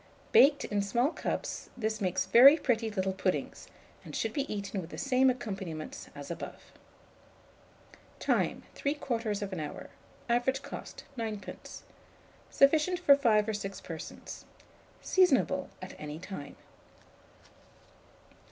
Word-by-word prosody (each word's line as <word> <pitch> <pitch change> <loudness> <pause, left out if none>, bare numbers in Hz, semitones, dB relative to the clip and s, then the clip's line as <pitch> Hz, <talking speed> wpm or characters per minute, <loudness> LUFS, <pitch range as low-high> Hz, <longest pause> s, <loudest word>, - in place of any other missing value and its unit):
Baked 280 +1 +6
in 205 -1 0
small 240 +8 +1
cups, - - -4
this 220 -2 -2
makes 185 -2 0
very 275 +6 +9
pretty 230 -6 0
little 190 -2 -1
puddings, 185 -1 -2 0.4
and - - -9
should - - -1
be 280 -2 -2
eaten 200 -1 -3
with 165 - -9
the - - -8
same 265 -1 +3
accompaniments 195 - -5
as - - -7
above. - - -8 1.5
Time. - - 0
3/4 225 - -2
hour. 150 -1 -6 0.4
Average 250 +3 +1
cost, - - -8 0.2
9d. 215 -3 -6 0.7
Sufficient 310 +6 +4
for 315 -6 +6
5 225 -6 +3
or - - 0
6 195 -1 -5
persons. 165 -3 -8 0.6
Seasonable 270 - +3
at 185 - -7
any 150 0 -6
time. 170 -5 -8
220 Hz, 115 wpm, -30 LUFS, 190-270 Hz, 1.5 s, very